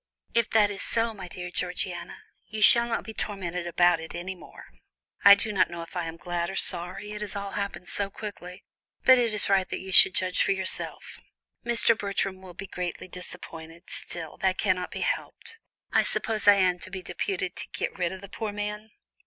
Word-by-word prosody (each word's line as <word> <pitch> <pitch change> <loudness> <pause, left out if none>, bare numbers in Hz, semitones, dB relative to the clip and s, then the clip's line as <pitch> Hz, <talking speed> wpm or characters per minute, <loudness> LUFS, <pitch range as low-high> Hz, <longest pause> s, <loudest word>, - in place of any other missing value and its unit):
"If 235 -1 +2
that 210 -2 +4
is 200 - -6
so, 230 0 0
my 190 -4 -9
dear 180 0 -7
Georgiana, 180 0 -3 0.2
you 215 0 -2
shall 235 +1 +8
not 235 - -2
be 220 - -8
tormented 180 -5 -4
about 175 0 +3
it 160 - -8
any 180 +2 -4
more. 180 - -14 0.6
I 200 0 +10
do 210 +2 +1
not 195 - +3
know 170 -1 -6
if 165 - -14
I 175 -2 -2
am 165 0 -6
glad 175 0 -3
or 195 - -6
sorry, 180 +5 -1
it 210 0 -6
has 210 -1 -5
all 200 0 -4
happened 200 -3 -4
so 200 -1 -2
quickly, 195 -3 -8 0.4
but 260 -1 +7
it 235 -2 +1
is 210 - +6
right 195 -2 +2
that - - -3
you 190 0 -8
should 185 - +9
judge 185 -1 +1
for - - +3
yourself. 190 -1 -3 0.4
Mr. 235 -1 +3
Bertram 195 -2 -2
will 185 -2 -12
be 195 - -7
greatly 180 -1 -5
disappointed, 170 -2 -7
still, 165 -3 -4
that 190 -1 0
cannot 180 -3 0
be - - -6
helped. 455 - -3 0.3
I - - +4
suppose 215 -2 -2
I 205 - +9
am 180 -2 +2
to - - -8
be 185 -1 -7
deputed 180 0 -3
to - - -5
get - - -3
rid 175 -1 0
of 190 0 -8
the 200 - -9
poor 215 0 -4
man." 210 +1 -5
190 Hz, 210 wpm, -27 LUFS, 180-210 Hz, 0.6 s, I